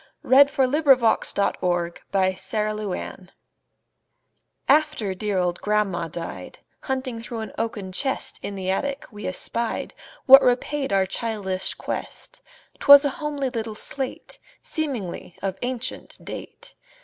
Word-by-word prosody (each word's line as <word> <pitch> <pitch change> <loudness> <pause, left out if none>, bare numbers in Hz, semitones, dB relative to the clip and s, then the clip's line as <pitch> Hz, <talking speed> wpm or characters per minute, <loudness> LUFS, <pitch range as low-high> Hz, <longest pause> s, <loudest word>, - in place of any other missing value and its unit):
Eugene 280 +2 +7
Field 265 -2 +1
Little 295 -3 +6 0.7
Homer's 180 +2 0
Slate 210 -4 -3 1.4
AFTER 285 -9 +2
dear 200 +1 -2
old 180 -1 0
grandma 200 -5 0
died, 165 +1 -7 0.2
Hunting 260 -3 -3
through 230 -1 -5
an 220 - -6
oaken 215 -4 -3
chest 265 +8 -2
In 200 - -5
the 190 -1 -2
attic, 280 +8 -2
we 210 -2 -6
espied 230 +5 -2 0.3
What 270 0 +10
repaid 265 +2 +1
our 195 -1 +3
childish 195 -2 -2
quest; - - -6 0.4
'Twas 285 0 +9
a - - +3
homely 290 -3 -2
little 225 -3 -4
slate, 265 +4 -4 0.2
Seemingly 245 - -4
of 190 -1 -2
ancient 250 0 -4
date. - - -8
220 Hz, 120 wpm, -24 LUFS, 190-265 Hz, 1.4 s, What